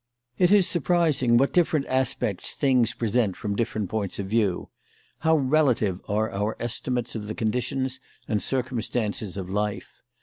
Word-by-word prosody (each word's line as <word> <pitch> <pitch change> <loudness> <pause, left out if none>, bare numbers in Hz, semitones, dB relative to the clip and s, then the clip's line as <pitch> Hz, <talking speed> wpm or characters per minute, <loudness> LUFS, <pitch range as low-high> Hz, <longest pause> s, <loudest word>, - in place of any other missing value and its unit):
It 180 0 +4
is 205 -3 +6
surprising 155 -7 +2
what 135 +3 +2
different 160 -5 +2
aspects 130 -7 -1
things 125 -4 +2
present 115 -4 +1
from 100 -1 -3
different 110 -2 -1
points 105 -4 -2
of 100 - -3
view; 100 -3 0 0.5
how 160 0 +3
relative 130 - +2
are 110 +2 0
our 105 +3 -2
estimates 120 +1 -2
of 105 -2 -5
the 110 - -4
conditions 125 +3 -1 0.3
and 105 -2 0
circumstances 115 -6 -2
of 95 -2 -4
life. 105 +2 -2
120 Hz, 145 wpm, -25 LUFS, 105-130 Hz, 0.5 s, is